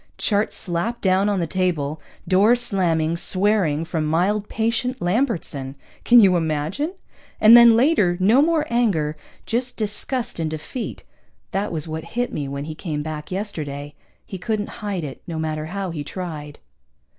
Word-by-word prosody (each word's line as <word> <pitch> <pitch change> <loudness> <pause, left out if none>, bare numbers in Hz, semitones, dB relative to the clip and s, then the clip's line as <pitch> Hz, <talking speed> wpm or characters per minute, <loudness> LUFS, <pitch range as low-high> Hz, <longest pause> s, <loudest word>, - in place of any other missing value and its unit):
Chart 205 0 +1
slapping 180 +7 -2
down 190 +1 +2
on 200 -2 0
the 170 - 0
table, 160 -4 -1 0.3
door 200 +6 +5
slamming, 170 -9 +1
swearing 185 -5 +1
from 165 -2 -2
mild, 195 +6 +1
patient 230 +3 -1
Lambertson, 175 - -1 0.3
can 240 0 +7
you 195 -4 +6
imagine? 165 - -1 0.4
And 220 +2 +8
then 235 -1 +9
later, 230 - +3
no 215 +9 +5
more 315 0 +2
anger, 185 -11 +1 0.3
just 245 +2 -2
disgust 220 +2 -3
and 160 -1 -1
defeat. 155 - -6 0.5
That 200 +2 -1
was 160 -2 -2
what 160 0 -5
hit 245 0 0
me 145 -2 -3
when 140 +1 -5
he 155 - -5
came 155 -2 -4
back 155 -1 -6
yesterday. 150 -8 -4 0.3
He 190 - -7
couldn't 210 +3 -3
hide 200 -5 -3
it, 140 -3 -7
no 165 -2 -4
matter 155 -1 -3
how 195 +1 -4
he 155 -3 -4
tried.) 150 -3 -7
185 Hz, 155 wpm, -22 LUFS, 155-220 Hz, 0.5 s, then